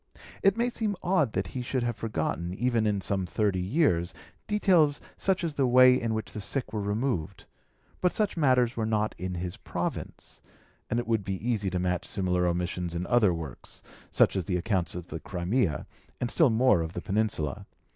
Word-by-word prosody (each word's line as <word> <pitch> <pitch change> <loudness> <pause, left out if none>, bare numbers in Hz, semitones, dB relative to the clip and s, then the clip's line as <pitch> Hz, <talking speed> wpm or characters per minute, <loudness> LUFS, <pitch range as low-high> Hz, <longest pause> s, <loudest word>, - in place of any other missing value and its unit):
It 195 +2 +4
may 240 +1 +1
seem 215 -4 -1
odd 165 - +2
that 95 - -2
he 130 - -3
should 125 0 -1
have 120 -1 -1
forgotten, 90 -4 -3
even 120 -1 +1
in 100 -2 0
some 95 -1 -1
thirty 100 -1 0
years, 90 - +1 0.3
details 180 -8 +3 0.2
such 190 -2 0
as 165 -3 -1
the 140 -2 +1
way 130 +1 +7
in 115 -1 -1
which 110 -1 -4
the 105 - -5
sick 110 +2 -2
were 105 - -1
removed; 105 - -2 0.6
but 180 - +3
such 215 -2 0
matters 130 -6 +3
were 110 -1 -1
not 110 -1 0
in 90 0 -3
his 90 0 -4
province; - - -5 0.5
and 120 - +1
it 120 - -3
would 110 -3 0
be 95 +4 -4
easy 105 -5 0
to 90 - -2
match 90 0 -1
similar 90 -2 0
omissions 85 0 -2
in 85 +1 -2
other 115 -4 +4
works, 80 -6 -7 0.3
such - - +3
as 95 -3 -1
the 90 0 0
accounts 90 -1 -1
of 90 -1 -5
the 80 - -6
Crimea, 90 - -1 0.3
and 120 - -2
still 160 -5 +4
more 115 -5 +4
of 80 +1 -4
the - - -4
Peninsula. 100 -9 -1
105 Hz, 195 wpm, -28 LUFS, 90-130 Hz, 0.6 s, way